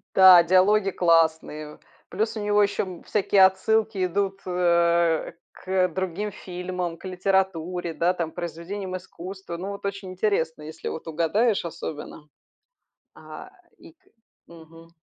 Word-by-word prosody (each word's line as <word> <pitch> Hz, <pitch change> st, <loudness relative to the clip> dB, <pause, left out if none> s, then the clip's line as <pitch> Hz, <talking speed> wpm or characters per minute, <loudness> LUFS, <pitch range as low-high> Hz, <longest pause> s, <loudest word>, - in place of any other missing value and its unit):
Да, 185 Hz, -2 st, +9 dB
диалоги 190 Hz, +3 st, +3 dB
классные. 160 Hz, -3 st, +1 dB, 0.3 s
Плюс 220 Hz, +4 st, -2 dB
у -, -, -4 dB
него 205 Hz, 0 st, +3 dB
еще, 205 Hz, 0 st, 0 dB
м, 185 Hz, -3 st, -9 dB
всякие 200 Hz, -2 st, +4 dB
отсылки 200 Hz, +1 st, +1 dB
идут, 195 Hz, +1 st, -2 dB
э, 170 Hz, -2 st, +2 dB, 0.2 s
к 185 Hz, 0 st, 0 dB
другим 190 Hz, +4 st, -3 dB
фильмам, 180 Hz, -2 st, -5 dB
к -, -, -14 dB
литературе, 180 Hz, -2 st, -1 dB
да, 175 Hz, +3 st, +1 dB
там 170 Hz, -3 st, -3 dB
к -, -, -27 dB
произведениям 180 Hz, +3 st, -5 dB
искусства. 185 Hz, 0 st, -9 dB
Ну 185 Hz, +3 st, -5 dB
вот 200 Hz, 0 st, -7 dB
очень 200 Hz, -1 st, -4 dB
интересно, 180 Hz, -5 st, -1 dB
если 155 Hz, +1 st, -8 dB
вот 160 Hz, -, -7 dB
угадаешь 175 Hz, +7 st, +1 dB
особенно. 150 Hz, -2 st, -7 dB, 0.9 s
А, -, -, -11 dB, 0.3 s
и 335 Hz, -1 st, -16 dB
к 325 Hz, -, -41 dB, 0.4 s
Мгм. 165 Hz, 0 st, -15 dB
180 Hz, 135 wpm, -24 LUFS, 170-195 Hz, 0.9 s, Да